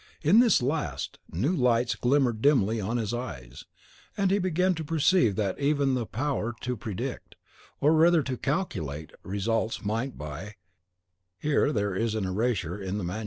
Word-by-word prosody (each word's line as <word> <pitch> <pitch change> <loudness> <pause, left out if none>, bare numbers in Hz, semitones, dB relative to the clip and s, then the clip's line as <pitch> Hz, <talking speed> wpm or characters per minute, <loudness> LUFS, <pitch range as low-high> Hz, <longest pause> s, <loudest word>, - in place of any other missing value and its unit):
In 175 +9 +6
this 240 - +4
last, 150 +4 -2
new 135 - 0
lights 125 -3 +2
glimmered 125 -3 +1
dimly 115 -6 +3
on 110 +5 -1
his 110 -2 -2
eyes; 65 - -6 0.5
and 195 -2 +2
he 200 - +3
began 185 0 +1
to 160 -2 -5
perceive 155 - +3
that 100 -3 -1
even 140 -1 +2
the 120 -4 -1
power 120 -2 -2
to 125 0 -2
predict, 105 -3 -6 0.4
or 150 +3 +4
rather 165 0 +5
to 130 -1 -3
calculate, 95 - -3
results, 110 +3 -2
might 115 +6 -2
by 80 +8 -7 0.8
(Here 145 +2 +1
there 100 -5 -1
is 110 +3 -1
an 105 -3 -1
erasure 100 -2 -1
in 95 +1 -3
the 105 - -3
MS.) 90 +5 -3
120 Hz, 165 wpm, -27 LUFS, 100-145 Hz, 0.8 s, In